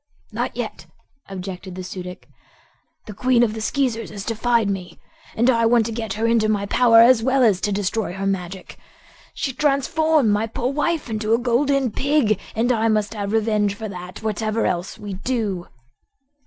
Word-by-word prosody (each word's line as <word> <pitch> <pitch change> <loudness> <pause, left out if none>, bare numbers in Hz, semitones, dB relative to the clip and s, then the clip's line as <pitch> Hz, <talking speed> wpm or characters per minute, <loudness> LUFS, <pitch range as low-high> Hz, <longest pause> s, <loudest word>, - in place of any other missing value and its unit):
"Not - - -3
yet," - - -5 0.4
objected 185 -1 -7
the 185 - -6
Su 185 0 -6
dic. 180 0 -9 0.8
"The 210 - -8
Queen 245 +3 +3
of 220 -3 +1
the 220 - -5
Skeezers 240 -1 -1
has 200 -1 -7
defied 230 -1 +1
me, 190 -3 -4 0.4
and 235 +2 +2
I 230 -3 +4
want 235 -1 +4
to 230 - -3
get 225 -3 -4
her 220 +2 -2
into 230 -2 +2
my 205 -2 0
power, 230 +2 +5
as 235 0 +6
well 260 +2 +2
as 200 -5 +3
to 210 - 0
destroy 205 0 -1
her 195 +1 -4
magic. 190 -1 -4 0.6
She 270 - -2
transformed 295 -1 +2
my 210 +2 +1
poor 250 +3 -3
wife 310 +2 -1
into 220 0 0
a - - +1
Golden 255 +1 +1
Pig, 265 -6 +1 0.2
and 235 +3 +1
I 225 -2 +1
must 215 -1 +1
have 205 -2 -4
revenge 210 -2 +1
for 220 +1 -6
that, 180 +2 -9
whatever 220 +1 -1
else 180 +2 -2
we 205 -1 -7
do." 200 -4 -2
220 Hz, 180 wpm, -22 LUFS, 200-245 Hz, 0.8 s, as